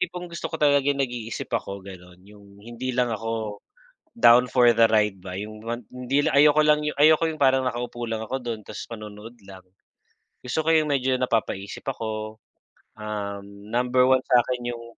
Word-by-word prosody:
tipong 180 0 -4
gusto 170 0 -5
ko - - -7
talagang 145 -1 +3
nag-iisip 120 -4 -4
ako, 100 0 -3
gano'n. 90 -2 -13
Yung 100 -1 -17
hindi 120 +3 -5
lang 125 -1 +1
ako 110 -1 -4 0.6
down 125 - +6
for 125 0 +5
the 115 - +6
ride 105 -2 +2
ba, 90 - -7
yung 105 +1 -7
wan 120 +1 -4
hindi 125 +3 -1
lang - - +1
ayoko 150 +1 +6
lang 150 0 +4 0.2
ayoko 155 +2 +5
yung 155 -1 -8
parang 130 -1 +3
nakaupo 120 -1 -4
lang 110 -1 -3
ako 130 +5 -3
dun 115 -2 -4
ta's - - -7
manonood 105 0 -9
lang. 95 -1 -12 0.8
Gusto 125 +5 -1
ko - - +1
yung 155 -1 +3
medyo 130 -2 +1
napapaisip 110 -5 -2
ako, 110 -3 -4 0.6
um, 100 -2 -5 0.3
number 125 +1 +2
1 130 0 +4
sa'kin 125 -1 +1
yung 115 - -10
120 Hz, 170 wpm, -24 LUFS, 105-130 Hz, 0.8 s, down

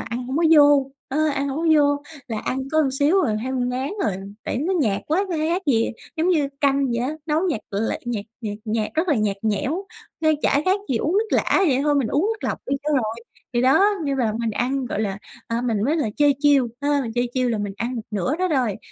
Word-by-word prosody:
ăn 240 +2 -5
hổng 265 +3 -3
có 335 - +2
vô, 285 -2 +5 0.2
ơ, 310 +3 +1
ăn 280 -1 -1
hổng 275 +3 -3
có 335 - -1
vô, 285 0 +2 0.3
là 220 -2 -3
ăn 260 - -2
có 315 0 +4 0.2
xíu 335 +7 +4
à, 220 -8 0
thấy 260 +1 -3
ngán 255 +2 -1
rồi. 210 - +1 0.3
Tại - - -2
nó 340 +7 0
nhạt 205 -6 +1
quá, 360 +6 +1
kh - - -7
khác 335 +5 0
gì 230 -5 +2 0.3
giống 330 +3 +1
như 305 -6 +2
canh 275 -1 +2
vậy 235 -2 -1
á, 255 +5 -1
nấu 305 +1 +1
nhạt 280 -10 -1
l 205 +3 -1
nhạt 225 -4 -3 0.2
nhạt 205 -2 -4
nhạt, 215 -1 -1
rất 330 +3 0
là 300 - +4
nhạt 210 -2 0
nhẽo, 270 - -1 0.3
nên 315 -1 +3
chả 285 - +3
khác 380 +2 +2
gì 250 - +1
uống 305 +8 0
nước 445 - 0
lã, - - +2
vậy 265 -1 +2
thôi 295 0 +2
mình 265 -6 +1
uống 295 - +1
nước 440 - -9
lọc - - -2
đi 275 - 0
cho 300 - -2
rồi. 225 -5 0 0.4
Thì 240 - +1
đó, 270 +10 +5 0.2
nhưng 275 -1 -1
mà 225 -4 +1
mình 230 -1 -1
ăn, 255 +4 -1
gọi 215 - -3
là, 200 -2 -2 0.3
à, 230 +1 -1
mình 225 -4 0
mới 300 +6 +1
lại 225 -9 -1
chơi 290 -1 +4
chiêu, 280 -5 +4
ha, 285 0 +1
chơi 245 0 0
chiêu 255 -1 +1
là 225 - -1
mình 205 -1 -3
ăn 240 +4 -3
một 225 - -4
nửa 210 - -1
đó 370 +1 0
rồi, 255 - 0
270 Hz, 250 wpm, -22 LUFS, 230-300 Hz, 0.4 s, vô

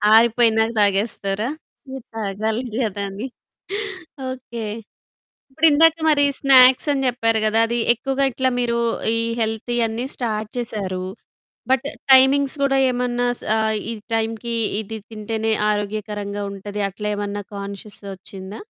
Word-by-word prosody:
ఆరిపోయినాక 225 -1 +4
తాగేస్తారా? 205 +2 +1 0.4
మీరు 265 -2 -7
తాగాలి 220 +2 -2
గదా 210 -5 -1
అని. 205 +7 -5 1.0
ఓకే. 240 -3 -7 0.9
ఇప్పుడిందాక 320 +2 +5
మరి 285 -1 +4
స్నాక్స్ 260 0 +6
అని 270 -1 0
జెప్పారు 225 -2 +1
గదా! 220 +1 +2
అది 235 +1 -1 0.2
ఎక్కువగా 270 +3 -1
ఇట్లా 260 +2 +1
మీరు 235 -1 0 0.4
ఈ - - +1 0.2
హెల్తీ 225 +2 -2
అన్నీ 230 +3 -3
స్టార్ట్ 215 -3 -3
చేశారు. 195 -6 -3 0.7
బట్ 265 +1 +2 0.3
టైమింగ్స్ 270 +2 +6
కూడా 270 -1 +3
ఏమన్నా 245 0 0
సా 220 - 0 0.3
ఈ - - -2 0.2
టైమ్‌కి 225 +1 -2 0.3
ఇది 220 +1 -6
తింటేనే 220 +1 -2 0.2
ఆరోగ్యకరంగా 205 0 -3
ఉంటది 205 +1 -6
అట్లా 210 +2 -5
ఏమన్నా 205 0 -3
కాన్షియస్ 200 +1 -8 0.2
ఒచ్చిందా? 190 +2 -9
225 Hz, 120 wpm, -21 LUFS, 205-250 Hz, 1.0 s, స్నాక్స్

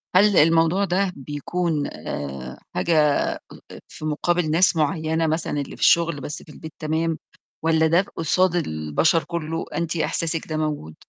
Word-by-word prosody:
هل 200 +1 +5
الموضوع 165 +5 +4
ده 190 +1 +1
بيكون 150 +3 -2
آآ، 65 -3 -6 0.2
حاجة 170 - +1 0.4
أ - - -9 0.3
أ - - -10
في 155 - -9
مقابل 155 +2 0
ناس 175 +3 +4
معيّنة 160 +1 0
مثلًا 155 -2 -1
اللي 140 - -7
في - - -15
الشغل 170 -4 +4
بس 145 - -6
في - - -19
البيت 160 0 -10
تمام، 160 +1 -1 0.5
والّا 160 0 +3
ده 170 +3 +4
قصاد 175 +2 +2
البشر 110 - +1
كله 165 -1 -4
أنتِ 170 -1 -1
إحساسِك 165 0 -1
ده 155 - -3
موجود؟ 150 - -3
160 Hz, 155 wpm, -23 LUFS, 150-170 Hz, 0.5 s, هل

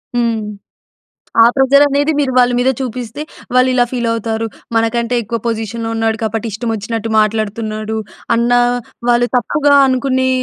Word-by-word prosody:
హ్మ్. 230 -2 0 1.0
ఆ - - +7
ప్రెజరనేది 280 +2 +3
మీరు 265 -3 0
వాళ్ళ 245 0 +5
మీద 255 +1 +2
చూపిస్తే 250 +2 -5 0.3
వాళ్ళు 255 0 +4
ఇలా 245 -1 +3
ఫీల్ 240 -2 -2
అవుతారు. 225 0 -2 0.3
"మనకంటే 235 +1 0
ఎక్కువ 230 +3 -3
పొజిషన్‌లో 225 0 -3
ఉన్నాడు 225 0 0
కాబట్టి 225 +1 -2
ఇష్టమచ్చినట్టు 225 0 -3
మాట్లాడుతున్నాడు." 215 0 -2 0.4
అన్న 235 +1 +1 0.6
వాళ్ళు 240 0 +3
తప్పుగా 285 +3 +2
అనుకునే 260 0 +1
235 Hz, 125 wpm, -16 LUFS, 225-255 Hz, 1.0 s, ఆ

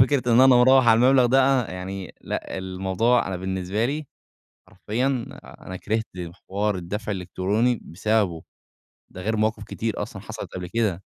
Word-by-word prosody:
فكرة 135 +1 +4
إن 120 - +6
أنا 130 - +8
مروح 130 0 +6
على 115 0 +6
المبلغ 130 0 +5
ده 130 -1 +3
يعني، 95 0 -6
لأ، - - -5
الموضوع 95 +6 +1
أنا 95 - -3
بالنسبة 95 +3 -2
لي، 145 +2 -3 0.6
حرفيًا 110 +7 -2 0.4
أنا 95 - -10
كرهت 110 +3 -1 0.4
حوار 105 +1 0
الدفع 105 +5 -4
الإلكتروني 100 +5 0
بسببه. 100 -2 -1 0.7
ده 95 - -10
غير 110 +3 -1
مواقف 110 0 0
كتير 110 0 -3
أصلًا 100 -2 -7
حصلِت 110 +1 -7
قبل 90 -1 -5
كده. 100 -3 -1
105 Hz, 150 wpm, -24 LUFS, 95-120 Hz, 0.7 s, أنا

